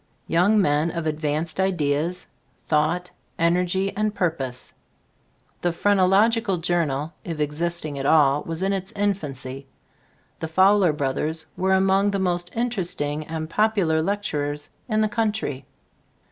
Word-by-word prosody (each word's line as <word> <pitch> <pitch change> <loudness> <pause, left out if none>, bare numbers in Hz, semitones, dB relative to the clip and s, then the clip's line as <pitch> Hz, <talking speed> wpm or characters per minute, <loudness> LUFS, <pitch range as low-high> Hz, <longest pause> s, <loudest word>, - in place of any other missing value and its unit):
Young 185 +6 +3
men 150 -2 +2
of 170 -1 -4
advanced 155 +2 -2
ideas, 175 -1 0 0.4
thought, 160 +4 0 0.3
energy 180 +3 +1
and 215 0 -1
purpose. 135 -8 -3 0.9
The 175 - +1
"Phrenological 200 +3 +3
Journal," 165 -3 -1
if 165 -3 -5
existing 155 0 -2
at 135 - -3
all, 145 -2 +4
was 165 +2 -3
in 195 +1 +1
its 190 -1 -3
infancy. 140 -10 -3 0.7
The 160 - -3
Fowler 190 +2 +4
brothers 150 +3 -1
were 190 +1 +1
among 195 +1 +3
the 200 - -1
most 175 -2 -1
interesting 170 -10 -1
and 160 -1 -4
popular 190 -4 +2
lectur 160 -6 -1
ers 145 0 -7 0.2
in 215 -1 +2
the 215 - +3
country. 210 - -2
170 Hz, 130 wpm, -23 LUFS, 150-195 Hz, 0.9 s, all